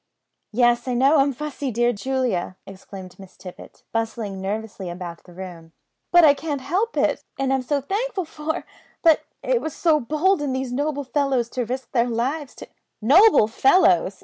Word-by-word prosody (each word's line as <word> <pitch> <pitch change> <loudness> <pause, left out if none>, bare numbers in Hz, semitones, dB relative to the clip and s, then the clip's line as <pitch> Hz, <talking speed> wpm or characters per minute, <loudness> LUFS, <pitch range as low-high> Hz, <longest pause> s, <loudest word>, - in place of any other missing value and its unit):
"Yes, 240 +2 +2
I 250 - -1
know 275 +5 +4
I'm 275 +1 +3
fussy, 285 0 -5
dear 240 +1 +1
Julia!" 230 -6 -2
exclaimed 190 -1 -11
Miss 190 -1 -14
Tippet, 180 -2 -12
bustling 225 -4 -3
nervously 205 -1 -4
about 175 -1 -7
the 180 - -15
room; 175 -3 -10 0.4
"but 350 0 +7
I 295 -3 +8
can't 290 0 -4
help 390 - -1
it, - - +1
and 270 0 0
I'm 265 - +1
so 280 +3 -1
thankful 400 - -2
for; 315 +2 -4 0.4
but 325 -2 +5 0.2
it - - +1
was 315 - -5
so 320 -3 +3
bold 310 +8 +1
in 280 -3 -2
these 260 -1 -3
noble 285 +1 -1
fellows 265 -3 0
to 250 -1 -3
risk 255 +2 -5
their 240 -1 +1
lives 260 +5 -2
to - - -11 0.2
" - - -54
"Noble 390 - +7
fellows!" 200 - +3
260 Hz, 175 wpm, -23 LUFS, 215-300 Hz, 0.4 s, I